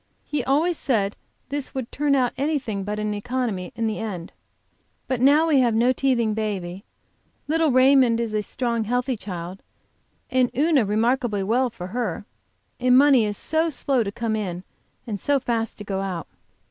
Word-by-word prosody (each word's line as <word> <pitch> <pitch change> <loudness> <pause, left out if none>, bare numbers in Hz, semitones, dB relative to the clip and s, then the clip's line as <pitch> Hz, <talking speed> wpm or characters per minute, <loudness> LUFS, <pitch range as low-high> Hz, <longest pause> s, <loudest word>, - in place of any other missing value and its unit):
He 295 -4 -2
always 315 +5 +1
said 210 -6 0 0.3
this 285 -1 -4
would 260 -3 -4
turn 290 0 +1
out 250 -3 +1
anything 265 -8 -2
but 210 +2 -3
an 210 0 -2
economy 215 -4 -3
in 230 0 -1
the 220 -1 -2
end. 195 -7 -5 0.8
But 255 -2 -1
now 290 +5 +5
we 305 -4 +4
have 240 -3 +3
no 240 +3 +3
teething 240 -5 +1
baby; 195 -4 -4 0.6
little 320 +1 +2
Raymond 255 -2 +5
is 230 -2 -2
a 215 - +1
strong, 235 +1 -2
healthy 245 +3 0
child, 185 -3 -7 0.7
and 255 -1 +3
Una 295 -5 +3
remarkably 220 0 +1
well 245 +6 +1
for 180 -5 -8
her, 210 -1 -3 0.5
and 250 0 +5
money 270 -5 +5
is 205 -1 -3
so 320 +1 +1
slow 270 -3 0
to 200 -3 -2
come 225 +1 -2
in 185 -4 -4 0.4
and 210 -4 -5
so 285 -1 +2
fast 230 -3 -2
to 210 - -7
go 195 -1 -3
out. 185 -4 -4
235 Hz, 170 wpm, -23 LUFS, 210-265 Hz, 0.8 s, now